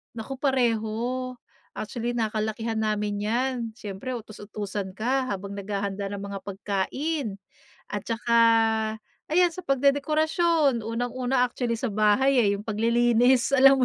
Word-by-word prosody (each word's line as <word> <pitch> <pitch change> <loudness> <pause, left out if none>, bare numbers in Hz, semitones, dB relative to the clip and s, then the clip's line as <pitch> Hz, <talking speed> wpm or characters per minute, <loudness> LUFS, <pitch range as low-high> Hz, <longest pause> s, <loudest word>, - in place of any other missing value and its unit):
Naku 235 +4 -6
pareho, 250 -1 0 0.4
actually, 235 +3 -3
nakalakihan 220 0 -2
namin 210 -1 -1
yan. 240 +6 0 0.2
Siyempre 215 +3 -6
utus-utusan 205 -3 -6
ka 255 +6 0
habang 200 -3 -5
naghahanda 200 0 -3
ng 200 - -5
mga 200 0 -5
pagkain. 205 +4 -2 0.4
At 210 - -4
saka, 235 +1 +1 0.9
ayan, 345 +1 +3
sa 370 - -7
pagdedekorasyon, 290 0 +2
unang-una 245 +3 0
actually 240 -2 -2
sa 225 -3 -3
bahay 235 +5 +4
eh, 205 - +3
yung 205 - -10
paglilinis, 240 +4 +3
alam 270 0 +7
230 Hz, 115 wpm, -26 LUFS, 210-260 Hz, 0.9 s, alam